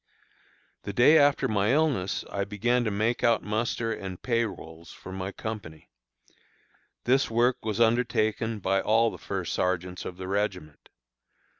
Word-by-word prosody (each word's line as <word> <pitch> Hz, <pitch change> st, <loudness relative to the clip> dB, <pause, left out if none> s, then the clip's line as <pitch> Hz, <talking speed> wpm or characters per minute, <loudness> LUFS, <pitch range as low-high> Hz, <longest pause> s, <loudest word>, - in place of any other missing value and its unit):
The 100 Hz, -, -6 dB
day 125 Hz, +9 st, +6 dB
after 145 Hz, -1 st, +3 dB
my 105 Hz, +1 st, +1 dB
illness 140 Hz, -11 st, 0 dB
I 100 Hz, -, -1 dB
began 115 Hz, +5 st, 0 dB
to -, -, +1 dB
make 110 Hz, +4 st, -1 dB
out 115 Hz, -1 st, +3 dB
muster 115 Hz, +1 st, -1 dB
and 95 Hz, -4 st, -7 dB
pay 115 Hz, -2 st, +1 dB
rolls 80 Hz, -5 st, -9 dB
for 95 Hz, -, -11 dB
my 95 Hz, +1 st, -4 dB
company. 100 Hz, -8 st, -7 dB, 1.1 s
This 135 Hz, +3 st, +2 dB
work 120 Hz, +2 st, +1 dB
was 110 Hz, -1 st, -2 dB
undertaken 115 Hz, -1 st, +1 dB
by 95 Hz, -1 st, 0 dB
all 115 Hz, +1 st, +3 dB
the -, -, -10 dB
first 95 Hz, -3 st, -4 dB
sergeants 90 Hz, 0 st, -1 dB
of 90 Hz, -, -7 dB
the 95 Hz, 0 st, -6 dB
regiment. 95 Hz, -6 st, -3 dB
110 Hz, 150 wpm, -27 LUFS, 95-120 Hz, 1.1 s, day